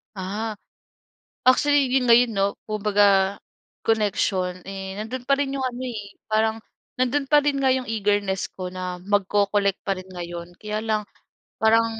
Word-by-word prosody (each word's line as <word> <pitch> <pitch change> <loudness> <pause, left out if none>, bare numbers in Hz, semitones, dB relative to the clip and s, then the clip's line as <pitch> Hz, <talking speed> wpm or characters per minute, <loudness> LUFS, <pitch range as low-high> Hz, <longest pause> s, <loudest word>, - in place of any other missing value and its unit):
Ah, 205 +3 -4 0.9
actually 285 +1 +5
'yon 260 0 +3
ngayon 235 0 +6
'no 195 0 +3 0.2
kung 215 -1 -4
baga 200 -1 +4 0.5
connection, 195 -4 +1
eh, 195 0 -6
nando'n 245 +4 -5
pa 275 - +5
rin 275 -1 -1
'yong 270 - -2
ano, 250 0 -4
eh. 205 -4 -7
Parang 220 +1 +1 0.4
nandoon 275 +3 +1
pa 295 - +8
rin 290 -1 +1
nga 265 -1 +4
'yong 260 -1 -2
eagerness 205 -3 0
ko 185 -1 -6
na 180 -1 -5
magko-collect 200 0 +1
pa 195 - +1
rin 185 - -8
ngayon. 175 -1 -7
Kaya 210 0 -3
lang 215 -1 0 0.6
parang 225 +1 +5
210 Hz, 155 wpm, -24 LUFS, 195-240 Hz, 0.9 s, pa